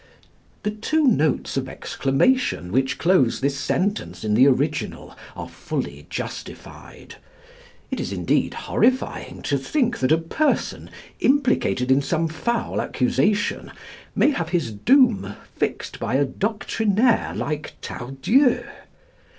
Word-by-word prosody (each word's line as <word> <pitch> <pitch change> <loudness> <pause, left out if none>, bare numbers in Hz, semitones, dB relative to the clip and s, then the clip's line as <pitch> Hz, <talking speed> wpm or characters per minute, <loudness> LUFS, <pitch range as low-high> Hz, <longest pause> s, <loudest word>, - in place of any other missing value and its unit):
The 210 - 0
two 305 +9 0
notes 155 - +1
of 130 0 -2
exclamation 135 - 0
which 130 +3 +1
close 165 -9 +3
this 140 +1 0
sentence 200 +8 -2
in 105 -1 0
the 125 +6 +6
original 145 +3 -1 0.2
are - - -6
fully - - -5
justified. - - -8 0.7
It - - -2
is - - -3
indeed - - 0
horrifying 255 +1 0
to - - 0
think 245 -6 0
that 130 +2 +1
a 160 - +6
person, 165 - -1 0.3
implicated 255 - +2
in 135 +2 +5
some 165 +3 0
foul 230 +10 -2
accusation, 140 +11 0 0.4
may - - +4
have 165 - -3
his 165 -10 -1
doom 240 - +3 0.2
fixed - - -3
by 120 - -1
a 140 +1 +3
doctrinaire 220 - 0
like 155 0 -3
Tardieu. 135 - +1
165 Hz, 120 wpm, -23 LUFS, -, 0.7 s, the